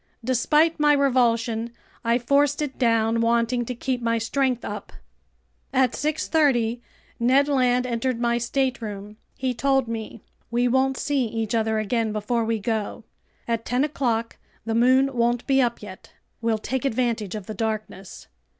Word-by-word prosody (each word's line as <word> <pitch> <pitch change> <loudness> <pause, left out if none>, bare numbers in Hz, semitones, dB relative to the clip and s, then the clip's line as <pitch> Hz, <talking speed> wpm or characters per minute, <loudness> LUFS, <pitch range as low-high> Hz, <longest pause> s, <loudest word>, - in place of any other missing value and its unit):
Despite 300 +7 +2
my 295 0 +5
revulsion, 235 -4 +1 0.3
I 235 0 +2
forced 280 +3 +2
it 275 -3 -6
down, 230 -2 +2
wanting 235 +1 +1
to 250 - -4
keep 250 +1 -2
my 230 0 +1
strength 250 +2 -1
up. - - -6 0.8
At 260 -2 +3
6:30 275 -6 +1 0.4
Ned 260 +4 +4
Land 250 -3 +2
entered 240 0 -1
my 235 0 +1
stateroom. 225 -5 -3 0.2
He 255 -1 -1
told 270 0 +1
me: 225 -1 -6 0.3
"We 240 +2 +1
won't 265 +1 +2
see 280 -3 0
each 225 -1 -3
other 220 -1 +1
again 220 +1 0
before 215 +3 -1
we 225 0 0
go. 220 +1 -3 0.4
At 230 -1 -1
ten 250 +4 0
o'clock 235 -6 -1 0.3
the 225 - -1
moon 260 +4 +4
won't 240 0 +1
be 270 -1 +3
up 235 -3 -1
yet. 190 -2 -11 0.3
We'll 230 -1 +1
take 255 +4 -3
advantage 230 -6 -1
of 210 -3 -6
the 215 - -6
darkness. 215 -3 -5
235 Hz, 150 wpm, -24 LUFS, 225-260 Hz, 0.8 s, my